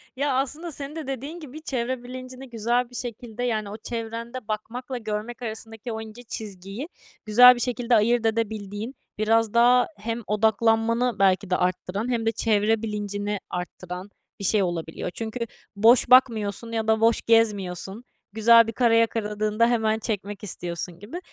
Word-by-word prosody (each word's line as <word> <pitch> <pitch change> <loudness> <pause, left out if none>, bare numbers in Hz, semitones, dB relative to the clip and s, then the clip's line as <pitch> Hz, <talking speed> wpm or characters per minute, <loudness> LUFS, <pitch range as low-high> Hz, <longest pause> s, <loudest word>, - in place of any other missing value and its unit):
Ya, 280 0 0
aslında 295 +6 -2
senin 285 0 -7
de 315 -4 -6
dediğin 275 +6 -5
gibi 305 -1 -10
çevre 255 -3 -3
bilincini 255 +1 -9
güzel 235 +2 0
bir 245 - -13
şekilde, 240 -1 -5
yani, 215 -4 -1
o 210 - -7
çevrende 230 +1 -5
bakmakla 240 +4 -4
görmek 220 +2 -5
arasındaki 225 0 -6
o 220 0 -4
ince 220 +2 -10
çizgiyi 205 - -7 0.4
güzel 250 +4 +8
bir - - -6
şekilde 245 0 +1
ayırt 230 +2 +3
edebildiğin, 220 +1 -2 0.2
biraz 220 0 +2
daha 245 +1 +5
hem 230 +3 -4
odaklanmanı 225 +2 +2
belki 195 0 +3
de 180 - +2
arttıran 185 +5 -1
hem 230 -2 -1
de 225 - +3
çevre 220 -1 +1
bilincini 205 -1 -3
arttıran 180 +1 -6 0.3
bir - - -6
şey 205 +1 +3
olabiliyor. 170 -1 -3
Çünkü 225 +2 -5 0.4
boş 230 +4 +5
bakmıyorsun 230 -3 +4
ya 225 -1 -2
da 220 0 +3
boş 225 0 +4
gezmiyorsun. 205 -2 +1 0.3
Güzel 230 +1 +6
bir 225 - -4
kare 230 -1 +3
yakaladığında 215 0 +1
hemen 220 -2 +1
çekmek 205 -2 -4
istiyorsun 175 -2 -5
gibi. 225 - -7
225 Hz, 155 wpm, -25 LUFS, 210-245 Hz, 0.4 s, güzel